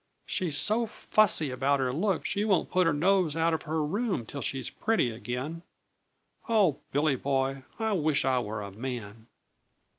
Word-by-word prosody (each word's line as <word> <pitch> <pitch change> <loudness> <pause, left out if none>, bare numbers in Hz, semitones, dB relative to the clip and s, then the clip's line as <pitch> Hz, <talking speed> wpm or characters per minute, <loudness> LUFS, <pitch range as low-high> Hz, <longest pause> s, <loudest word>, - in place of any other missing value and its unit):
She's 165 -6 -1
so 225 +7 +2
fussy 200 -10 +2
about 140 +2 +1
her 130 -1 0
looks 185 +3 0
she 200 0 0
won't 200 -5 +1
put 180 -1 +3
her - - +4
nose 175 +1 +2
out 165 0 +2
of 160 - -1
her 155 0 -1
room 200 - -1
till 140 +4 -7
she's 130 0 -2
pretty 220 - 0
again. 125 +8 -5 0.9
Oh, 200 -11 +3
Billy 145 0 +2
Boy, 135 +1 -1 0.2
I 220 -1 -1
wish 155 -5 +1
I 130 -1 +2
were 105 -2 -4
a 100 - -7
man!" 115 -1 -6
150 Hz, 170 wpm, -28 LUFS, 130-185 Hz, 0.9 s, her